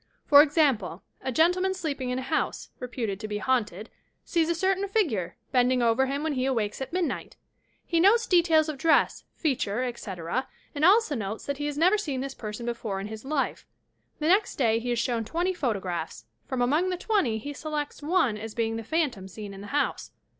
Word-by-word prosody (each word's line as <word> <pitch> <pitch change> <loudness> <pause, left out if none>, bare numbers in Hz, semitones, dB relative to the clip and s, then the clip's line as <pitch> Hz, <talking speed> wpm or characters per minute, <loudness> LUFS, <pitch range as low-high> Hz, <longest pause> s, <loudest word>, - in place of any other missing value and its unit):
For 285 -1 +9
example: 275 - +1 0.2
a 260 - -2
gentleman 360 +7 +2
sleeping 285 -8 -3
in 250 - -1
a 260 - -3
house, 310 +4 -2
reputed 235 -6 -3
to 215 - -5
be 210 -1 -3
haunted, 215 -4 -1 0.3
sees 330 -2 +1
a 340 - +1
certain 385 +3 +1
figure, 255 - 0
bending 250 0 +3
over 235 +3 +3
him 280 +2 -2
when 315 -1 0
he 260 -1 0
awakes 225 -3 -1
at 265 - -4
midnight. 360 -1 -2 0.6
lie 335 - +5
notes 440 +6 +5
de 355 -2 +5
tails 320 -2 +3
of 300 -3 -5
dress, 320 +3 +3
feature, 255 -6 -1
etc., 220 -2 -3 0.3
and 295 0 -3
al.so 395 -1 +5
notes 215 -4 -4
that 280 0 -3
he 290 - -1
has 290 -1 -4
never 365 +7 +4
seen 285 -10 -3
this 270 +1 -4
person 215 0 -6
before 230 -4 -3
in 200 +2 -5
his 220 0 -8
life. 275 0 -2 0.5
The 305 - -1
next 390 +4 +3
day 225 -4 +2
he 245 +1 -4
is 240 - +1
shown 230 -1 0
twenty 345 - -1
photographs. 190 - -3 0.2
From 255 -2 0
among 305 +9 +2
the 365 - -1
twenty 365 - +1
he 285 +7 -6
selects 300 0 -4
one 295 - +1
as 220 0 -7
being 225 -1 -1
the 225 - -5
phantom 260 - -1
seen 205 +1 -8
in 195 - -9
the 205 - -8
house. 290 - -1
265 Hz, 205 wpm, -27 LUFS, 225-320 Hz, 0.6 s, For